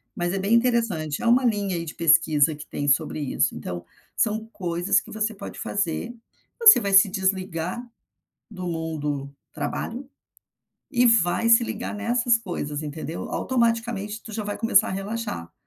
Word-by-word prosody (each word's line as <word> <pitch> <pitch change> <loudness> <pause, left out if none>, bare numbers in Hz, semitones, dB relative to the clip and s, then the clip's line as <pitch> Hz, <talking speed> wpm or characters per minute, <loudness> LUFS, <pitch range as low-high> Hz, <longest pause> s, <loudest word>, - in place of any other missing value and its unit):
mas 175 +1 -2
é 195 - -1
bem 200 +4 0
interessante. 230 -11 +1
É - - 0
uma 250 +2 +4
linha, 200 -5 0
aí, 165 0 -3
de 155 - -8
pesquisa 155 -2 +4
que 150 - -11
tem 145 - -4
sobre 155 +2 +1
isso, 140 - 0
então 85 -1 -6 0.3
são 220 0 0
coisas 175 -1 0
que - - -14
você 220 0 -2
pode 200 - -9
fazer. 205 +4 -2 0.5
Você 455 -2 +9
vai 200 -1 -2
se 195 +1 +7
desligar 190 0 -2 0.7
do 165 -4 -4
do 145 -1 -3 0.2
trabalho 230 - -5 0.8
e 245 0 +2
vai 230 0 +3
se 230 +1 +7
ligar 220 0 -5
nessas 235 +2 +1
coisas, 155 -7 -5
entendeu. 155 +2 -6
Automaticamente 230 -4 -1
tu 220 - -10
já 215 -1 -4
vai 205 - -4
começar 225 -3 +3
a - - -4
relaxar. 195 - -5
195 Hz, 160 wpm, -24 LUFS, 160-230 Hz, 0.8 s, Você